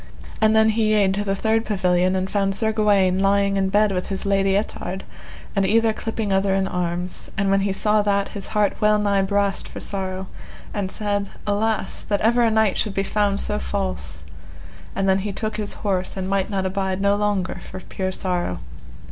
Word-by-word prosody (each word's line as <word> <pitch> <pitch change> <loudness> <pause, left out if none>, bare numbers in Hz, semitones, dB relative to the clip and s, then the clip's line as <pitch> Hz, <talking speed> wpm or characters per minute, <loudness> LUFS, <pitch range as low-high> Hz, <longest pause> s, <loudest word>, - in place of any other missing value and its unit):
And 220 0 +4
then 220 0 +5
he 215 -1 +2
yede 195 -2 +3
to 205 +1 -1
the 195 -1 -1
third 220 +2 +1
pavilion 185 -3 +1
and 185 0 -1
found 195 0 0
Sir 220 +1 +1
Gawaine 200 -4 +3
lying 200 0 +2
in 190 -1 +1
bed 205 +1 +3
with 180 -1 -2
his 195 0 -3
Lady 195 -1 +2
Ettard, 190 -2 -4 0.5
and 195 - +2
either 220 +3 +3
clipping 220 -2 -3
other 195 0 +2
in 195 0 +1
arms, 180 0 -3
and 195 0 +1
when 195 - +4
he 195 0 0
saw 210 +2 +2
that 200 -1 +1
his 200 -2 -6
heart 210 -2 +1
well 210 0 +4
nigh 200 -1 +2
brast 200 0 0
for - - -8
sorrow, 190 -1 -2 0.5
and 200 -2 -2
said: 205 0 -2 0.2
Alas! 210 0 0
that 205 -1 0
ever 235 +3 +3
a 230 - +4
knight 220 -2 +2
should 210 -2 -1
be 195 - +1
found 200 0 0
so 70 - 0
false; 65 0 -3 0.7
and 195 - 0
then 190 0 +3
he 205 +1 -3
took 215 +2 -3
his 210 -1 -3
horse 190 -1 0
and 185 -1 -2
might 195 0 0
not 195 -2 -1
abide 190 0 -1
no 200 0 +3
longer 205 -4 -1
for 185 - -8
pure 185 0 -4
sorrow. 180 - -2
195 Hz, 200 wpm, -22 LUFS, 190-210 Hz, 0.7 s, then